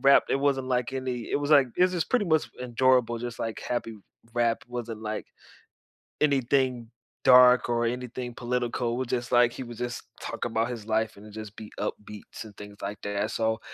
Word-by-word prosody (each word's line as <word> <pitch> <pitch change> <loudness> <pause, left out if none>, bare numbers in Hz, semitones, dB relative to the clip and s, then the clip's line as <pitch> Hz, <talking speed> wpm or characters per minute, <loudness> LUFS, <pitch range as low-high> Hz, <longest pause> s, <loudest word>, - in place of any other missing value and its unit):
rapped 140 +1 +5
it - - +3
wasn't, 135 -2 +1
like, 125 0 0
any 130 -3 -3
it - - +2
was, 145 +1 -2
like, 140 -3 +7
it 180 - +4
was 185 - +4
just 175 -2 -1
pretty 250 -5 +3
much 160 -4 +2
enjoyable, 125 -1 +2
just, 120 0 -5
like, 115 -1 -3
happy 120 -2 -3 0.4
rap, 120 -1 +1
wasn't, 120 -3 -5
like, 110 0 -4 0.9
anything 130 -4 +1 0.3
dark 125 -1 +7
or 120 0 +1
anything 125 0 -4
political, 120 -1 -1
it - - -2
was 130 - -1
just, 120 -1 -2
like, 120 0 +6
he 130 - -6
would 120 -1 -9
just 120 0 -4 0.2
talk - - -4
about 115 0 0
his 115 -3 -6
life 110 -1 0
and 105 +1 -13
just 110 -1 -8
be 110 -1 -9
upbeats 105 +1 -6
and 105 -2 -13
things 105 0 -10
like 100 +1 -4
that 100 +1 -1
so 110 0 0
120 Hz, 195 wpm, -27 LUFS, 110-130 Hz, 0.9 s, like